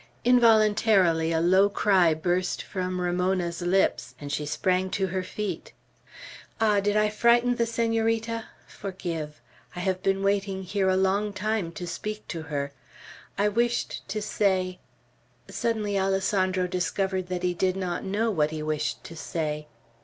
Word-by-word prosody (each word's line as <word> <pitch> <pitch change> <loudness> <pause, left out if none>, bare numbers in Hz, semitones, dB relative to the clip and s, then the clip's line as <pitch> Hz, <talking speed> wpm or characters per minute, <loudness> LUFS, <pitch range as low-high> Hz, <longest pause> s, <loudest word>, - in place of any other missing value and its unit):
Involuntarily 215 -8 +4
a 165 - +2
low 190 +4 +4
cry 185 -6 +3
burst 180 +3 -1
from 185 -1 -3
Ramona's 180 -1 0
lips, 175 -9 +1
and 145 -1 -6
she 145 0 -2
sprang 185 +5 0
to 190 +1 0
her 190 0 -2
feet. 205 +3 -5 0.9
"Ah! 210 -2 +3
did 205 +1 +1
I 210 0 +4
frighten 240 +3 +3
the 235 - +1
Senorita? 225 0 0 0.2
Forgive. 170 -6 -5 0.4
I 180 - -4
have 185 0 -1
been 195 0 0
waiting 195 -1 0
here 190 +1 0
a 185 - +2
long 200 +2 +1
time 210 -4 -1
to 175 - -6
speak 210 +5 -5
to 165 - -4
her. 145 -2 -3 0.7
I 205 +1 +3
wished 235 +3 0
to 210 +2 -3
say 185 -3 0 0.3
" - - -38
Suddenly 210 -3 -1
Alessandro 190 -1 +1
discovered 185 +1 -1
that 180 0 -3
he 180 0 +1
did 185 +1 0
not 185 -2 -3
know 210 +4 0
what 155 -6 +1
he 155 -1 -5
wished 155 -1 -2
to 165 - -10
say. 150 -2 -3
190 Hz, 155 wpm, -26 LUFS, 175-210 Hz, 0.9 s, Involuntarily